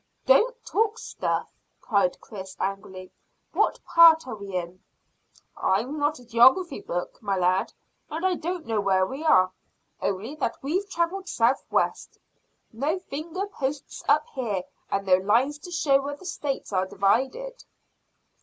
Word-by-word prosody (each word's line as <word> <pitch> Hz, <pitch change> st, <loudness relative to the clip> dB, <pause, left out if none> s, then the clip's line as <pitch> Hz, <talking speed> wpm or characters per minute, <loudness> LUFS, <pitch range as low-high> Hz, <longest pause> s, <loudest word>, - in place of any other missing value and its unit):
"Don't -, -, +5 dB
talk 440 Hz, +1 st, +1 dB
stuff!" -, -, -3 dB, 0.3 s
cried 200 Hz, -5 st, +1 dB
Chris 190 Hz, -3 st, -9 dB
angrily. 190 Hz, -1 st, -4 dB, 0.4 s
"What -, -, +1 dB
part 330 Hz, -1 st, +7 dB
are 250 Hz, -, -6 dB
we 200 Hz, -2 st, -8 dB
in?" 180 Hz, +1 st, -4 dB, 0.7 s
"I'm 240 Hz, +11 st, 0 dB
not 290 Hz, +1 st, +1 dB
a 250 Hz, -, -15 dB
geography 260 Hz, +8 st, +4 dB
book, 175 Hz, 0 st, -5 dB
my 200 Hz, -3 st, -1 dB
lad, 185 Hz, +3 st, +1 dB, 0.4 s
and 325 Hz, +4 st, -3 dB
I 375 Hz, -, +3 dB
don't 345 Hz, -1 st, -4 dB
know 220 Hz, -2 st, 0 dB
where 190 Hz, -1 st, +3 dB
we 270 Hz, +10 st, -6 dB
are, 185 Hz, -, +5 dB, 0.5 s
only 200 Hz, +7 st, -2 dB
that 250 Hz, -6 st, -2 dB
we've 370 Hz, +8 st, -1 dB
travelled 360 Hz, +2 st, -2 dB
south 240 Hz, +1 st, +2 dB
west. -, -, -1 dB, 0.6 s
No 285 Hz, +10 st, -1 dB
finger 340 Hz, +2 st, -5 dB
posts 280 Hz, -7 st, -5 dB
up -, -, +4 dB
here 215 Hz, -9 st, -2 dB, 0.3 s
and 195 Hz, 0 st, -1 dB
no 185 Hz, -1 st, +5 dB
lines 235 Hz, +10 st, +1 dB
to 355 Hz, -, -10 dB
show 285 Hz, -5 st, +3 dB
where 285 Hz, +1 st, -4 dB
the 370 Hz, -, -15 dB
States 280 Hz, -, -4 dB
are 185 Hz, 0 st, +1 dB
divided." 265 Hz, -, 0 dB
265 Hz, 150 wpm, -26 LUFS, 195-330 Hz, 0.7 s, part